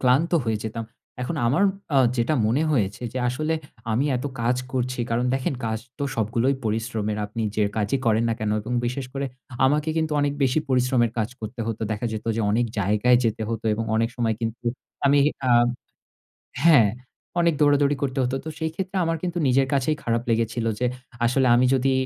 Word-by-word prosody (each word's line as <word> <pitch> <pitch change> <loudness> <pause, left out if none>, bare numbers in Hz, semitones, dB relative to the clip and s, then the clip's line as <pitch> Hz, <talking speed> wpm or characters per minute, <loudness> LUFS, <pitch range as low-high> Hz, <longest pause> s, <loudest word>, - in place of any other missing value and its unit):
ক্লান্ত 130 +6 +3
হয়ে 110 -2 0
যেতাম। 110 +1 -4 0.4
এখন 160 +6 -3
আমার 145 +11 +2 0.3
আ - - +5 0.2
যেটা 120 +6 +1
মনে 130 +8 +2
হয়েছে 105 -4 0
যে 130 - -3
আসলে 155 +6 -1 0.4
আমি 130 +6 +1
এত 125 - -5 0.2
কাজ 120 +2 +2 0.2
করছি 125 -1 -1
কারণ 120 +2 +1
দেখেন 135 0 -1
কাজ 110 0 -1 0.2
তো - - -3
সবগুলোই 115 +5 +1
পরিশ্রমের। 110 -1 -1
আপনি 110 +2 -4
যে 105 -1 +2
কাজই 110 +5 +1
করেন 110 +1 +3
না 115 - +1
কেনো 105 0 0
এবং 115 +4 -6
বিশেষ 125 +1 -3
করে 140 0 -2 0.4
আমাকে 150 +3 +2
কিন্তু 160 -1 0
অনেক 145 0 +1
বেশি 130 +3 +3
পরিশ্রমের 125 -2 +2
কাজ 110 - 0
করতে 110 +2 -6
হতো। 115 -1 -3
দেখা 110 +3 -2
যেত 110 - -5
যে - - 0
অনেক 120 +3 +2
জায়গায় 105 +5 +3
যেতে 110 0 0
হতো 115 -1 -4
এবং 115 +1 -2
অনেক 115 0 +2
সময় 115 -2 +1
কিন্তু 115 +1 -4 0.4
আমি 140 +1 +5 0.3
আ - - +3 1.1
হ্যাঁ, 145 -11 +7 0.5
অনেক 170 -1 +3
দৌড়াদৌড়ি 145 0 +4
করতে 135 -1 -1
হতো। 125 +2 -1
তো - - -3
সেই 160 0 -1
ক্ষেত্রে 190 +1 -4
আমার 165 0 0
কিন্তু 175 -1 -2
নিজের 135 +1 +3
কাছেই 140 +3 +1
খারাপ 115 0 0
লেগেছিল 115 0 0
যে 125 - +1 0.4
আসলে 130 +2 +3
আমি 125 - +4
যদি 135 +1 +2
125 Hz, 190 wpm, -24 LUFS, 115-140 Hz, 1.1 s, হ্যাঁ